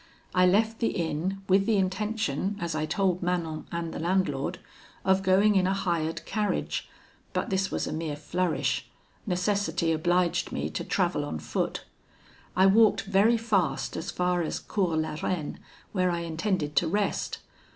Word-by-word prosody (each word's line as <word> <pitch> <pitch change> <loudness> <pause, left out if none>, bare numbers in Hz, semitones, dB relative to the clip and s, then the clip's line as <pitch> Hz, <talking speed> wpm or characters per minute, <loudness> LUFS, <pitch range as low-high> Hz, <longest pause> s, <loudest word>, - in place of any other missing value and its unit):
I 180 0 +5
left 220 +4 +2
the 230 - +2
inn, 175 +2 -2
with 195 +1 +4
the 220 -2 +3
intention, 200 -2 -1
as 170 -3 -2
I 155 0 -1
told 180 +1 +1
Manon 170 -3 -2
and 170 -1 -3
the - - -5
landlord, 170 -5 0 0.5
of 190 0 +4
going 195 +3 +4
in 185 -1 +4
a 190 - +1
hired 170 -4 -1
carriage, 210 -2 -1 0.4
but - - -1
this 190 0 +1
was - - -1
a - - -4
mere 155 -1 -3
flourish; 165 +4 -1 0.4
necessity 185 -2 +1
obliged 175 +2 +1
me - - -2
to - - -3
travel - - 0
on 80 +2 -4
foot: 75 - -3 0.7
I 190 - +5
walked 215 +3 +5
very 205 +3 +4
fast 210 -7 0
as 160 - -4
far 180 0 +1
as 160 - -2
Cours 180 -6 -1
la 155 -1 -2
Reine, 165 -5 -2 0.3
where 185 -2 +1
I 170 -1 -1
intended 165 -2 -1
to 170 - +4
rest. 205 +4 -1
180 Hz, 160 wpm, -28 LUFS, 165-195 Hz, 0.7 s, I